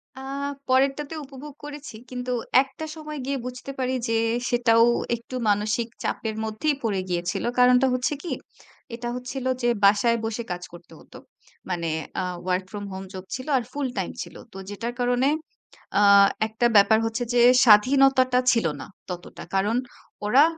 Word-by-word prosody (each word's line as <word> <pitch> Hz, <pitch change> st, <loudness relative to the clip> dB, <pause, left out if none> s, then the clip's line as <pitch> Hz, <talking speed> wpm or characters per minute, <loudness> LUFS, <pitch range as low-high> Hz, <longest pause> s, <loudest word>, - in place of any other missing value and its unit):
আ -, -, -10 dB, 0.5 s
পরেরটাতে 275 Hz, +3 st, +2 dB
উপভোগ 275 Hz, +2 st, -10 dB
করেছি। 295 Hz, -5 st, -8 dB
কিন্তু 250 Hz, 0 st, -4 dB, 0.3 s
একটা 275 Hz, +4 st, -8 dB
সময় 305 Hz, -2 st, -7 dB
গিয়ে 275 Hz, 0 st, -1 dB
বুঝতে 250 Hz, +2 st, -6 dB
পারি 255 Hz, 0 st, 0 dB
যে, 230 Hz, -, +1 dB, 0.3 s
সেটাও 230 Hz, -1 st, +4 dB, 0.3 s
একটু 235 Hz, +2 st, -9 dB
মানসিক 210 Hz, +3 st, +1 dB, 0.2 s
চাপের 220 Hz, -1 st, -2 dB
মধ্যেই 220 Hz, +8 st, -1 dB
পড়ে 200 Hz, -4 st, 0 dB
গিয়েছিল। 175 Hz, 0 st, -2 dB, 0.2 s
কারণটা 250 Hz, +1 st, +5 dB
হচ্ছে 255 Hz, +4 st, 0 dB
কি? 345 Hz, -, -3 dB, 0.6 s
এটা 240 Hz, 0 st, -6 dB
হচ্ছিল 250 Hz, +1 st, -5 dB, 0.2 s
যে, 240 Hz, -, +2 dB
বাসায় 210 Hz, +4 st, +4 dB
বসে 225 Hz, +1 st, -3 dB
কাজ 180 Hz, 0 st, -4 dB
করতে 175 Hz, 0 st, -14 dB
হত। -, -, -20 dB, 0.6 s
মানে 170 Hz, -2 st, -2 dB, 0.3 s
আ -, -, -2 dB, 0.2 s
ওয়ার্ক 185 Hz, +1 st, 0 dB
ফ্রম 205 Hz, 0 st, -6 dB
হোম 190 Hz, -, -6 dB
জব 185 Hz, -1 st, -7 dB
ছিল, 255 Hz, +3 st, -7 dB
আর 245 Hz, -, -1 dB
ফুল 285 Hz, -2 st, -2 dB
টাইম -, -, -2 dB
ছিল। -, -, -8 dB, 0.2 s
তো 195 Hz, -, -9 dB
যেটার 230 Hz, +4 st, -4 dB
কারণে, 245 Hz, +2 st, +2 dB, 0.7 s
আ -, -, +4 dB, 0.5 s
একটা 220 Hz, +2 st, 0 dB
ব্যাপার 220 Hz, +2 st, +6 dB
হচ্ছে 225 Hz, +2 st, -2 dB
যে, 240 Hz, -, +4 dB, 0.2 s
স্বাধীনতাটা 255 Hz, +3 st, +5 dB
ছিল 230 Hz, -8 st, +1 dB
না -, -, -7 dB, 0.2 s
ততটা। 180 Hz, -1 st, -8 dB
কারণ 205 Hz, +4 st, +1 dB, 0.5 s
ওরা 270 Hz, +8 st, +6 dB
240 Hz, 155 wpm, -24 LUFS, 210-265 Hz, 0.7 s, ব্যাপার